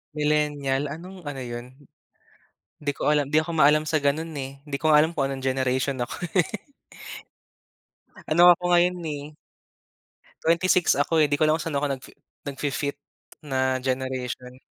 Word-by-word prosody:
Millenial, 150 -2 0
anong 175 +2 -9
ano 135 -2 -5
yun? 120 0 -6 1.1
Di 145 -1 -1
ko - - +1
alam. 145 -2 +2
Di 150 +2 +3
ako 170 - -5
maalam 150 0 +5
sa 155 0 0
ganun, 155 +4 0
eh. 135 +1 -7
Di 145 - -3
ko 155 +2 +2
nga 150 - +7
alam 160 +2 +3
kung 135 -2 +1
anong 135 -1 -5
generation 130 0 0
ako 120 - -3 0.2
eh. 180 - +5 1.8
Ano 175 +3 +7
ako 175 0 +1
ngayon 175 +1 +4
eh, 145 -2 -4 1.2
26 170 +2 +3
ako 155 +3 +2
eh. 150 - +3
Di 145 - +1
ko 155 - +3
alam 155 +1 +3
kung 170 - -5
saan 145 - -1
ako 145 +1 0
nag-fi 130 - -15 0.3
nag-fi-fit 140 0 -3 0.5
na 130 -2 0
generation. 130 -1 -4
145 Hz, 160 wpm, -25 LUFS, 135-155 Hz, 1.8 s, nga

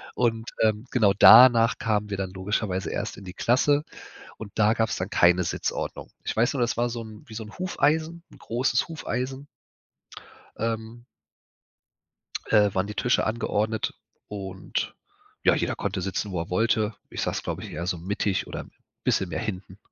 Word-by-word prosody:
und, 115 -2 0
ähm, 110 +1 +2
genau, 105 -6 +4
danach 120 0 +8
kamen 105 -2 -1
wir 100 - -3
dann 95 -1 -3
logischerweise 95 0 -2
erst - - -4
in 100 - -11
die 90 - -8
Klasse 145 +7 +2 0.5
und 105 -2 -8
da 110 0 +4
gab's 115 -1 0
dann 90 +2 -3
keine 90 -3 +4
Sitzordnung. - - -3
Ich - - -3
weiß 120 +4 +2
noch, 135 - -1
das 120 -1 0
war 120 +1 +1
so 120 0 -4
'n 110 -1 -12
wie 110 - -11
so 110 - -4
'n 105 - -12
Hufeisen, 165 -2 0
'n - - -15
großes 120 +4 0
Hufeisen 135 -3 -4 1.1
ähm 115 +1 -4 1.5
äh, 105 -3 +4
waren 95 +1 +1
die 105 - -6
Tische 125 - +2
angeordnet 110 -1 -1 0.3
und 95 -2 -4 0.5
ja, - - +6
jeder - - -1
konnte 100 -1 -2
sitzen, 95 +2 -3
wo 90 - -1
er 85 - -6
wollte. 110 +2 +1 0.2
Ich - - -4
saß, - - -2
glaube - - -4
ich, - - -8
eher 85 - -4
so 90 -1 -1
mittig 100 +2 -1
oder - - -6
'n - - -11 0.3
bisschen 95 - +1
mehr 80 -2 -3
hinten. 95 -2 -6
110 Hz, 175 wpm, -26 LUFS, 95-120 Hz, 1.5 s, danach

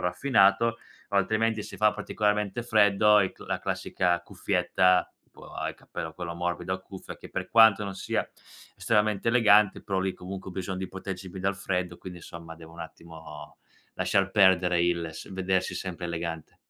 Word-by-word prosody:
raffinato, 115 +2 +3 0.3
o 100 - -1
altrimenti 110 +2 +1
si - - -9
fa 105 0 +3
particolarmente 105 +1 -1
freddo 105 -2 +5
i 95 - +1
c - - -26
e - - -9
la - - -1
classica 90 -1 -1
cuffietta 90 0 +1
tipo, - - -16
a - - -3
il - - -5
cappello - - -7
quello 85 -2 -5
morbido 90 +1 -3
a 95 - -3
cuffia, 95 0 -10
che - - -11
per - - -4
quanto 110 -3 +6
non 100 - -5
sia 95 - -2 0.5
estremamente 105 -1 +1
elegante, 105 -4 +4
però 95 -2 -2
lì 95 0 -1
comunque 95 +1 -8
ho - - -10
bisogno 95 +1 -4
di 95 -1 -4
proteggermi 95 -1 -7
più 95 - -7
dal 100 0 0
freddo, 90 -2 -3
quindi 90 -1 -9
insomma 85 -1 -10
devo 80 0 -13
un 85 - -11
attimo 80 -2 -11 0.4
lasciar 95 -1 +1
perdere 90 -3 +4
il 85 -1 0
s 80 - -10
vedersi 95 0 -1
sempre 90 -2 -5
elegante. 85 -1 -5
95 Hz, 180 wpm, -27 LUFS, 90-105 Hz, 0.5 s, quanto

